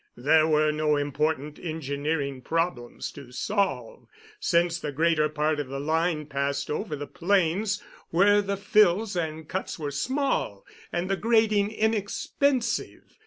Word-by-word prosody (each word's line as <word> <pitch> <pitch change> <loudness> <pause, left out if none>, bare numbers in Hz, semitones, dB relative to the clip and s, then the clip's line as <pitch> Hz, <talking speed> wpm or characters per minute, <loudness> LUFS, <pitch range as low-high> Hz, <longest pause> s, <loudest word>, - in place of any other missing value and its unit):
There 155 +5 +4
were 155 -1 +3
no 150 0 +1
important 150 +1 -1
engineering 145 -3 -3
problems 165 -5 -2
to 135 -3 -12
solve, 160 - -2 0.3
since 175 - +2
the 150 - -4
greater 155 +1 +2
part 150 0 0
of 145 - -3
the 135 +1 -5
line 160 +1 0
passed 140 0 -2
over 170 +1 -2
the 145 0 -5
plains, 190 +5 0 0.3
where 205 +4 +4
the 200 0 -2
fills 205 0 +3
and 160 -2 -3
cuts 190 - -4
were 150 -3 -4
small 250 - -1 0.3
and 175 +1 -1
the 195 0 0
grading 220 -2 +3
inexpensive. 230 +4 -1
160 Hz, 135 wpm, -26 LUFS, 145-200 Hz, 0.3 s, There